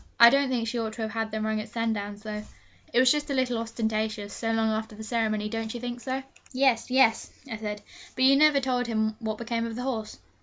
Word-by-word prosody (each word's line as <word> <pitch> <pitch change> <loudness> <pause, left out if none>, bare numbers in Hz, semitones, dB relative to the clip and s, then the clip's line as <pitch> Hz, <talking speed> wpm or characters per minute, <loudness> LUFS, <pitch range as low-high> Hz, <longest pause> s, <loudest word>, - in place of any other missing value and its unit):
I 235 0 +10
don't 275 0 +3
think 240 -3 0
she 235 +1 -2
ought 220 -1 -2
to 225 - -4
have 220 - -3
had 225 0 -2
them 215 0 -3
rung 220 0 0
at 215 - -9
Sandown 220 -3 -2
though: 210 0 -6 0.5
it 240 - +3
was 255 0 +6
just 295 0 0
a 280 - 0
little 250 -3 +1
ostentatious, 220 -2 -2
so 225 -1 -2
long 225 0 +2
after 220 0 -3
the 220 - -8
ceremony; 215 -2 0
don't 225 +1 -4
you - - -4
think 245 0 -5
so?' 265 +1 -3 0.3
'Yes 260 -3 +2
yes,' 250 -3 +3 0.2
I 225 -4 -5
said; 210 -1 -5 0.3
'but 255 - +1
you 275 +1 +7
never 295 0 +5
told 250 -2 -1
me 220 -1 +1
what 220 -2 -3
became 230 0 -2
of 225 - -6
the 250 - -4
horse.' 225 -5 -3
225 Hz, 240 wpm, -27 LUFS, 220-250 Hz, 0.5 s, I